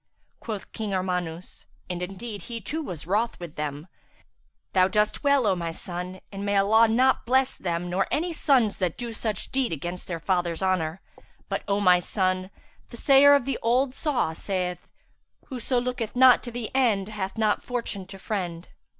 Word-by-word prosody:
Quoth 215 -4 -6
King 210 -3 -3
Armanus 180 -2 -4 0.2
(and 180 -1 -4
indeed 195 +4 -6
he 230 -1 -4
too 300 - -4
was 175 - -6
wroth 215 +6 0
with 170 -4 -8
them), 150 +1 -5 0.9
"Thou 185 -1 +5
dost 210 +6 0
well, 280 -3 +4
O 195 -3 +3
my 170 -2 -3
son, 180 +2 -7
and 200 0 -6
may 200 0 +1
Allah 220 +4 +5
not 255 +4 +3
bless 260 +1 +3
them 175 -1 -3
nor 185 +2 0
any 340 +3 -1
sons 255 -9 +2
that 180 -4 -1
do 235 -2 -5
such 215 -2 -3
deed 265 -2 0
against 175 +3 -5
their 170 -2 -4
father's 175 0 -1
honour. 185 -2 0 0.5
But, - - -1
O 200 0 +1
my 180 -3 +5
son, 185 0 -1 0.4
the 235 - -10
sayer 280 +3 +7
of 280 -4 +1
the 270 -2 -2
old 250 +3 +2
saw 275 - 0
saith, 180 0 -3 0.6
'Whoso 250 -1 -1
looketh 245 -2 -3
not 255 -1 +7
to 240 - -6
the 235 -2 -5
end 220 -7 +2
hath 200 -1 -4
not 215 -2 +2
Fortune 230 -6 -4
to 195 0 -10
friend.' 180 -4 -4
200 Hz, 175 wpm, -26 LUFS, 180-240 Hz, 0.9 s, sayer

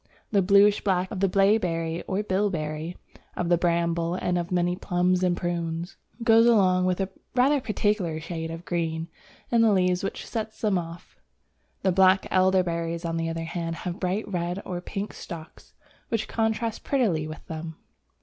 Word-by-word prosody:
The 200 -2 +4
bluish 200 +2 +5
black 185 -2 +1
of 205 - -4
the 195 0 +2
Blaeberry 180 -5 +2
or 195 +2 -1
Bilberry, 175 -5 -2 0.4
of 175 -1 -2
the 175 - +5
Bramble, 170 0 +1
and 180 -1 -1
of 175 0 -2
many 175 0 +1
Plums 180 0 +1
and 180 -1 +2
Prunes, 170 0 -3 0.3
goes 230 0 +6
along 185 -5 +4
with 185 0 0
a 195 0 -1 0.3
rather 270 +3 +4
peculiar 205 -8 0
shade 165 0 -5
of 165 +1 -7
green 165 -1 -2 0.4
in 235 -1 +4
the 225 -1 +5
leaves 180 -1 +2
which 195 - -4
sets 220 -1 -5
them 205 -4 +1
off. 170 0 -10 0.6
The 190 - +3
black 190 +1 +5
Elder 185 0 +4
berries, 170 0 -3
on 165 0 -1
the 165 0 -1
other 165 0 -3
hand, 165 0 -3
have 180 +2 -3
bright 190 +4 -1
red 175 -1 -2
or 180 -1 -4
pink 200 +3 -5
stalks 160 -3 -10 0.3
which 225 -2 -1
contrast 225 0 -1
prettily 195 - +1
with 155 +1 -9
them. 160 0 -6
180 Hz, 170 wpm, -26 LUFS, 170-200 Hz, 0.6 s, goes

